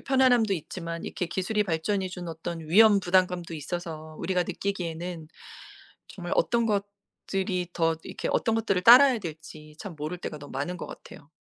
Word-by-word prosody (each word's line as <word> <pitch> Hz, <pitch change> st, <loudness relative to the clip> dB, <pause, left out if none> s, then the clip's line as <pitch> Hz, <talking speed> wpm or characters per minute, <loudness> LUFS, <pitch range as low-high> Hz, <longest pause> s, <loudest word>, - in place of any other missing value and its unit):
편안함도 255 Hz, -5 st, +3 dB
있지만 170 Hz, 0 st, -6 dB
이렇게 180 Hz, -, -3 dB
기술의 190 Hz, +5 st, 0 dB
발전이 190 Hz, +2 st, -1 dB
주는 180 Hz, -1 st, -7 dB
어떤 165 Hz, +1 st, -5 dB
위험 210 Hz, +4 st, +7 dB
부담감도 180 Hz, -2 st, +1 dB
있어서 155 Hz, 0 st, -6 dB
우리가 180 Hz, +1 st, 0 dB
느끼기에는 175 Hz, -3 st, -4 dB, 0.8 s
정말 -, -, -5 dB
어떤 235 Hz, -, +2 dB
것들이 200 Hz, -3 st, -3 dB
더 165 Hz, -1 st, +1 dB
이렇게 -, -, -5 dB
어떤 225 Hz, -, +1 dB
것들을 215 Hz, -5 st, 0 dB
따라야 250 Hz, +5 st, +8 dB
될지 155 Hz, -3 st, -9 dB
참 200 Hz, -6 st, -7 dB
모를 155 Hz, +4 st, -4 dB
때가 155 Hz, -3 st, -6 dB
너무 145 Hz, 0 st, -11 dB
많은 145 Hz, +7 st, -3 dB
것 -, -, -6 dB
같아요. 145 Hz, -, -12 dB
180 Hz, 375 characters per minute, -27 LUFS, 165-200 Hz, 0.8 s, 따라야